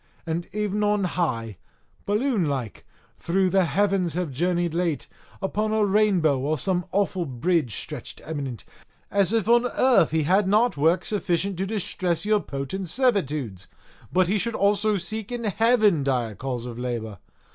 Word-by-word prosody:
And 165 +1 -3
ev'n 210 +1 -1
on 210 -1 +2
high, 120 - -2 0.5
balloon 215 -2 +1
like, 130 -7 -4 0.3
through 185 +1 +1
the 190 -1 +3
heavens 190 -2 +1
have 175 -4 -2
journeyed 175 +3 0
late, 170 -3 -1 0.4
upon 215 +3 -1
a 215 -1 +3
rainbow 190 -8 +3
or 150 +4 -1
some 180 +5 -1
awful 190 -3 0
bridge 130 - 0
stretched - - -7
eminent, 140 -7 -5 0.5
as 200 -1 +2
if 225 -3 +1
on 240 +1 +4
earth 250 - +3
he 160 0 +1
had 190 +6 +3
not 220 +5 +3
work 165 +5 +2
sufficient 195 -3 -1
to 190 +2 -2
distress 185 -4 -2
your 210 0 +3
potent 145 +5 -5
servitudes, 150 - 0 0.4
but 185 0 +3
he 205 +3 +1
should 235 +3 -2
also 205 +1 +2
seek 215 +4 -5
in 240 -1 -4
heaven 215 - +3
dire 125 -5 0
cause 125 +2 -4
of 120 -1 -7
labour! 115 -5 -4
180 Hz, 155 wpm, -25 LUFS, 145-210 Hz, 0.5 s, on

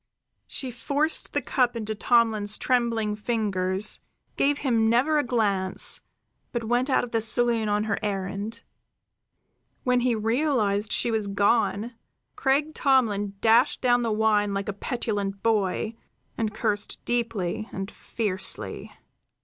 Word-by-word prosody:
She 260 -2 -4
forced 285 +6 0
the - - 0
cup 250 -2 +1
into 220 -1 -3
Tomlin's 215 -2 +2
trembling 230 -4 +1
fingers, 210 -3 -1 0.4
gave 285 +1 +2
him 230 -6 +2
never 275 +7 +3
a - - +1
glance, 200 -6 +1 0.5
but 240 -1 -2
went 245 +4 +1
out 260 - +3
of 245 - -6
the 225 - +1
saloon 230 -1 +1
on 210 0 +1
her 215 -2 -1
errand. 200 +1 -3 1.2
When 250 -1 +3
he 245 -1 +1
realized 220 -3 0
she 235 - +1
was 220 -2 -1
gone, 205 +2 +1 0.4
Craik 285 +3 +1
Tomlin 215 -9 +2
dashed 230 +5 +4
down 245 -1 +3
the 230 -2 0
wine 210 -2 +2
like 195 0 -3
a - - -2
petulant 200 -3 -3
boy, 215 0 +1 0.4
and 220 -2 -1
cursed 210 -1 -2
deeply 225 -4 -1
and 195 +2 -5
fiercely. 200 -5 -3
225 Hz, 135 wpm, -26 LUFS, 205-245 Hz, 1.2 s, dashed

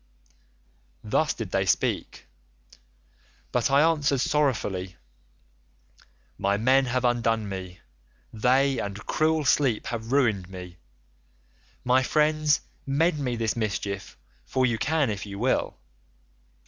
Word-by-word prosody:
"Thus 145 +8 +1
did 110 -5 -6
they 95 0 0
speak, - - -1 1.3
but 125 +2 +1
I 140 +1 +5
answered 150 -4 +2
sorrowfully, 110 -11 0 1.4
'My 100 +1 +1
men 130 +5 +3
have 125 0 -1
undone 115 -3 +1
me; 95 -2 -7 0.5
they, 130 +4 +2
and 100 +1 -5
cruel 155 -1 +1
sleep, 130 -5 +2
have 115 0 -5
ruined 110 -10 +1
me. 90 -2 -9 1.1
My 125 +1 +3
friends, 150 +1 +2 0.2
mend 150 +4 +1
me 125 -4 -2
this 115 -2 -1
mischief, 100 -3 -3 0.3
for 130 -1 0
you 120 -3 0
can 145 -2 +1
if 105 0 -5
you 100 -1 -7
will. 125 - 0
120 Hz, 115 wpm, -26 LUFS, 100-140 Hz, 1.4 s, I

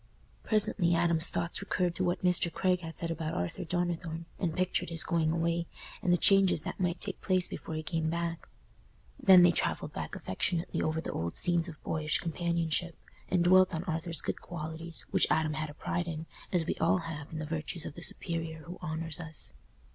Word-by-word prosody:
Presently 205 -5 +3
Adam's 170 -1 +3
thoughts 170 +2 -2
recurred 180 -3 0
to 185 - -1
what 175 0 0
Mr. 180 -1 +3
Craig 180 +2 +1
had 165 -2 -8
said 170 -1 -2
about 160 -1 -3
Arthur 90 - -2
Donnithorne, 170 -1 -2
and 165 -4 -1
pictured 185 0 0
his 165 -1 -2
going 165 -3 +1
away, 170 +1 0 0.3
and 180 - +1
the 175 - +5
changes 195 -4 +5
that - - -5
might 180 -1 0
take 195 - -5
place 185 -2 +3
before 160 - -6
he 155 - -3
came 160 -1 -1
back; 170 0 -3 0.7
then 185 -2 +8
they 175 - +7
travelled - - -1
back - - -5
affectionately 170 - -1
over 160 +1 0
the - - -4
old 85 +1 -3
scenes 175 -1 +2
of 160 - -10
boyish 155 -1 +1
companionship, 170 0 -1 0.3
and 180 -1 +3
dwelt 185 0 +5
on 160 - -2
Arthur's 165 -2 -1
good - - -3
qualities, 165 0 -5
which - - +4
Adam 155 -1 +2
had 155 0 -3
a 145 - -10
pride 175 +2 -2
in, 160 -1 -4 0.3
as 175 -3 +2
we - - 0
all 165 - +4
have 150 -3 -6
in 160 - -5
the 155 - -3
virtues 160 +1 -3
of - - -5
the 170 - -9
superior 165 -2 -2
who 175 +3 -9
honours 160 0 -3
us. 160 - -6
170 Hz, 200 wpm, -31 LUFS, 160-175 Hz, 0.7 s, then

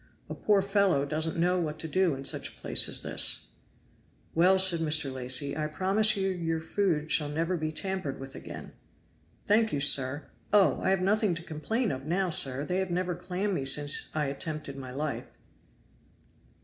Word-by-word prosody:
A - - -2
poor 205 -2 +1
fellow 195 -8 +2
doesn't 155 +3 -2
know 180 +2 +1
what 155 -3 -3
to 160 - -6
do 180 -2 +1
in 135 +1 -8
such - - 0
a - - -18
place - - +2
as - - -5
this." - - 0 0.8
"Well," 180 +3 +4
said 185 -3 +5
Mr. 150 -4 +1
Lacy, 130 +2 +2
"I 155 -1 -2
promise 200 +6 +2
you 195 0 0
your 165 -3 -2
food 165 -2 -1
shall 150 -2 +2
never 165 +4 -1
be 155 -2 -3
tampered 185 -5 -4
with 135 0 -9
again." - - -9 0.7
"Thank 220 +1 +3
you, 145 - -1
sir. 140 0 +1 0.3
Oh! 205 -2 +4
I - - 0
have 190 -1 +1
nothing 205 -1 +1
to 165 - -6
complain 205 +9 -2
of 135 +2 -6
now, 180 +2 0
sir; 135 -2 +3
they 180 +2 -2
have 190 -1 -2
never 180 +1 -1
clammed 185 +3 -3
me 140 - -2
since 145 +2 +3
I 150 -1 0
attempted 145 +1 -5
my 135 -2 -8
life." 145 +3 -4
165 Hz, 185 wpm, -28 LUFS, 150-190 Hz, 0.8 s, said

